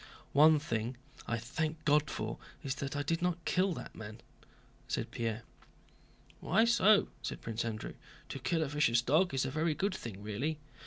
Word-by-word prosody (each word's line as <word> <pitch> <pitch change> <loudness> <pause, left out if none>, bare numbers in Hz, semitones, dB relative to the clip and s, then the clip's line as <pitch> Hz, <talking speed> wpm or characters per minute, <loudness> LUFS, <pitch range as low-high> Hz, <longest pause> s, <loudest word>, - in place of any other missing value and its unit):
"One 155 +2 +7
thing 120 -4 -2 0.3
I 115 - 0
thank 155 +7 -3
God 150 0 +4
for - - -4 0.2
is 135 - -1
that 140 0 -3
I 145 - 0
did 165 +3 0
not 175 -1 -1
kill 185 +1 +2
that - - -8
man," 110 +1 -8 0.7
said - - -2
Pierre. 115 -1 -2 1.0
"Why 225 - +3
so?" 215 -3 +5
asked - - -4
Prince 115 0 -2
Andrew. 110 -1 -4 0.4
"To 135 - -5
kill 160 +6 +1
a - - -2
vicious 135 -5 +3
dog 165 +8 +3
is 135 0 0
a 130 - -2
very 155 +2 +1
good 200 +4 0
thing 105 - -7
really." 125 +10 -2
145 Hz, 175 wpm, -33 LUFS, 115-160 Hz, 1.0 s, One